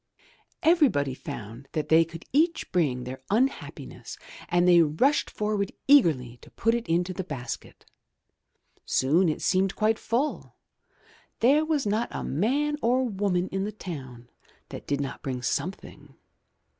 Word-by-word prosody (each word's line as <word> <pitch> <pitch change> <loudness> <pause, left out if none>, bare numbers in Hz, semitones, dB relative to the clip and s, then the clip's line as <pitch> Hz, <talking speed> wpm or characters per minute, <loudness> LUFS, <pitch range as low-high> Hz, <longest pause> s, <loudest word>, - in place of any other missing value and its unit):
Everybody 260 - +3
found 125 - -8
that 155 - -2
they 160 +1 +6
could 165 +1 -10
each 325 +4 +1
bring 140 -9 +1
their 130 +1 -7
unhappi 250 +7 0
ness - - -10 0.3
and 175 +1 +3
they 175 -1 +7
rushed 165 - +2
forward 210 -2 -2 0.2
eagerly 150 - +4
to - - -15
put 230 - 0
it 235 -3 -2
into 175 +2 0
the 190 - -4
basket. 135 -7 -7 1.0
Soon 160 +7 +2
it 155 - -3
seemed 190 0 +1
quite 220 +1 +1
full. 265 +6 -2 0.8
There 280 +6 +4
was 310 -4 0
not 215 +3 0
a - - -5
man 280 - 0
or 250 +3 +2
woman 195 -5 0
in 195 0 -2
the 210 - -3
town 130 - -8 0.4
that - - -9
did 140 -1 0
not 140 -1 -4
bring 125 -2 -4
something. 180 +8 -4
185 Hz, 145 wpm, -26 LUFS, 145-235 Hz, 1.0 s, they